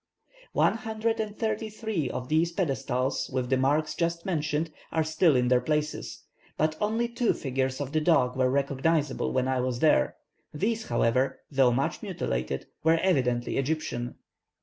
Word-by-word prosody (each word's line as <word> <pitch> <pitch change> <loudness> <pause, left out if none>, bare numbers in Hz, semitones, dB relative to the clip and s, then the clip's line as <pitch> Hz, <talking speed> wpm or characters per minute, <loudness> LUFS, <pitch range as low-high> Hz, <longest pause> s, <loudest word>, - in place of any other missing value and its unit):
One - - +3
hundred 225 0 -2
and 215 -1 -3
thirty 220 -1 -1
three 210 - -2
of 125 - -4
these 160 +3 +2
pedestals 135 -7 -1
with 130 -1 -2
the 130 - +4
marks 145 +4 +1
just 170 0 -1
mentioned 155 -2 -1 0.2
are 160 -1 +1
still 155 0 +3
in 125 -1 +3
their 125 0 +4
places, 150 0 -2 0.3
but 155 +1 +1
only 225 +3 +1
two 235 0 +1
figures 130 -1 -2
of 140 -2 -4
the 155 0 +1
dog 150 -6 +3
were 130 -1 +2
recognizable 140 +2 0
when 130 0 +1
I 130 -1 +1
was 125 -1 -1
there; 120 - +3 0.4
these, 220 +8 -1
however, 120 +3 +1
though 135 -3 +4
much 135 +3 -1
mutilated, 60 +2 -3 0.2
were 160 +1 +4
evidently 125 -10 +1
Egyptian. 135 -4 -2
150 Hz, 160 wpm, -28 LUFS, 130-170 Hz, 0.4 s, the